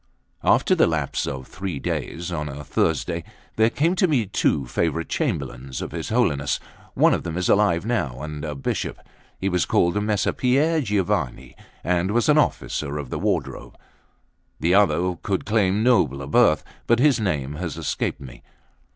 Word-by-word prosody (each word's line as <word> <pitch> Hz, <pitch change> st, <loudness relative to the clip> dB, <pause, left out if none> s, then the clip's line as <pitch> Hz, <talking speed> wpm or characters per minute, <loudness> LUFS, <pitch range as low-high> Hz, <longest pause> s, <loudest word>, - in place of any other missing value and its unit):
LXI -, -, +1 dB
AFTER -, -, +1 dB
the -, -, +4 dB
lapse -, -, -1 dB
of 65 Hz, -1 st, -5 dB
three 90 Hz, -1 st, -5 dB
days, 85 Hz, +5 st, -4 dB
on 75 Hz, -3 st, -3 dB
a 70 Hz, +1 st, -7 dB
Thursday, 85 Hz, +3 st, -1 dB, 0.3 s
there 110 Hz, +1 st, +4 dB
came 165 Hz, +9 st, +1 dB
to 185 Hz, -, +4 dB
me 135 Hz, -9 st, +2 dB
two 75 Hz, -7 st, 0 dB
favourite 80 Hz, +5 st, -1 dB
Chamberlains 65 Hz, +1 st, -3 dB
of -, -, -5 dB
his -, -, -5 dB
Holiness; 70 Hz, -1 st, +1 dB, 0.4 s
one -, -, +5 dB
of -, -, 0 dB
them 85 Hz, 0 st, -5 dB
is 90 Hz, -, 0 dB
alive 100 Hz, -3 st, +3 dB
now, 85 Hz, -, -1 dB
and 75 Hz, -1 st, -6 dB
a 75 Hz, -1 st, -4 dB
bishop; 70 Hz, -, -3 dB, 0.4 s
he 95 Hz, -, -2 dB
was 90 Hz, -3 st, +1 dB
called 85 Hz, +4 st, +2 dB
Messer 105 Hz, -2 st, 0 dB
Pier 150 Hz, +6 st, +2 dB
Giovanni, 90 Hz, -, -1 dB, 0.3 s
and 90 Hz, +1 st, +1 dB
was 115 Hz, +3 st, +1 dB
an 150 Hz, 0 st, +6 dB
officer 75 Hz, -, -1 dB
of 70 Hz, -4 st, -6 dB
the -, -, -2 dB
wardrobe; -, -, -2 dB, 0.8 s
the 85 Hz, +3 st, +2 dB
other 90 Hz, -2 st, +3 dB
could 95 Hz, -2 st, -2 dB
claim 105 Hz, -1 st, +2 dB
nobler 70 Hz, -, +2 dB
birth, 75 Hz, +2 st, +3 dB, 0.2 s
but 120 Hz, -, +4 dB
his 135 Hz, 0 st, +4 dB
name 75 Hz, -9 st, -1 dB
has 85 Hz, -3 st, -4 dB
escaped -, -, -2 dB
me. 65 Hz, -2 st, -11 dB
85 Hz, 170 wpm, -23 LUFS, 75-105 Hz, 0.8 s, an